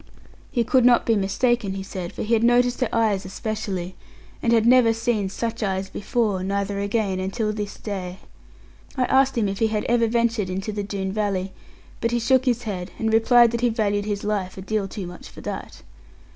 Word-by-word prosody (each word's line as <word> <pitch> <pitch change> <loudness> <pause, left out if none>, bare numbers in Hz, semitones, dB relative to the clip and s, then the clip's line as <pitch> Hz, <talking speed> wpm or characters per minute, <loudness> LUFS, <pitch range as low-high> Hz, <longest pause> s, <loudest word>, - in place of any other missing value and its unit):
He 240 - +1
could 255 +2 +3
not 245 0 +5
be 225 - +3
mistaken, 205 +1 0
he 195 - -4
said, 185 -3 -6
for - - -5
he 225 - -1
had 225 0 +3
noticed 245 +1 +3
her 255 - +1
eyes 215 -4 +1
especially; 190 -2 -4 0.5
and 235 - +1
had 225 -1 +4
never 240 -2 +6
seen 225 -4 0
such 230 +3 -4
eyes 190 -2 -2
before, 210 -3 -1
neither 200 +1 -2
again, 200 -2 -1
until 210 +3 -2
this 210 -1 -5
day. 185 -3 -5 0.8
I 255 - +2
asked 265 0 +3
him 215 -3 +2
if 195 0 -3
he 225 - +3
had 215 -1 -1
ever 235 -1 +2
ventured 230 -3 0
into 190 +3 -3
the 205 0 -3
Doone 195 -1 -3
valley; 195 -2 -2 0.5
but 230 - 0
he 240 - 0
shook 260 +2 +3
his 245 -2 +1
head, 190 -4 -4
and 220 0 -1
replied 235 +1 +6
that 235 0 -2
he 245 - +3
valued 205 -3 0
his 205 -1 -3
life 200 -3 -2
a 190 - -7
deal 210 0 -1
too 195 0 -6
much 175 0 -10
for - - -12
that. - - -7
215 Hz, 205 wpm, -23 LUFS, 195-235 Hz, 0.8 s, never